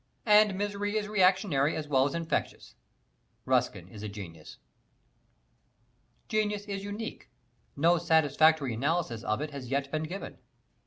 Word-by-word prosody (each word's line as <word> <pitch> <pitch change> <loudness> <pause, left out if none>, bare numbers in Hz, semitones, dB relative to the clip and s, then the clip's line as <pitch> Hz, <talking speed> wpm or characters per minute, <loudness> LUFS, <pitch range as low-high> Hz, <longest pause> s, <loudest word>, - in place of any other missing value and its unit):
And 210 -2 +5
misery 205 +1 -2
is 210 -1 -2
reactionary 185 -7 +2
as 155 -1 -4
well 135 -2 +3
as 145 - -5
infectious. 165 -1 -3 0.7
Ruskin 90 -1 0
is 100 +2 -11
a 105 - -5
genius. 85 -7 -10 1.7
Genius 210 -1 -1
is 200 -1 -5
unique. 205 +3 -6 0.5
No 170 +4 +3
satisfactory 160 -4 +3
analysis 140 -1 -1
of 110 +5 -1
it 150 0 -4
has 135 -4 -7
yet 140 0 -1
been 155 - -1
given. 190 +5 -7
160 Hz, 130 wpm, -29 LUFS, 135-205 Hz, 1.7 s, And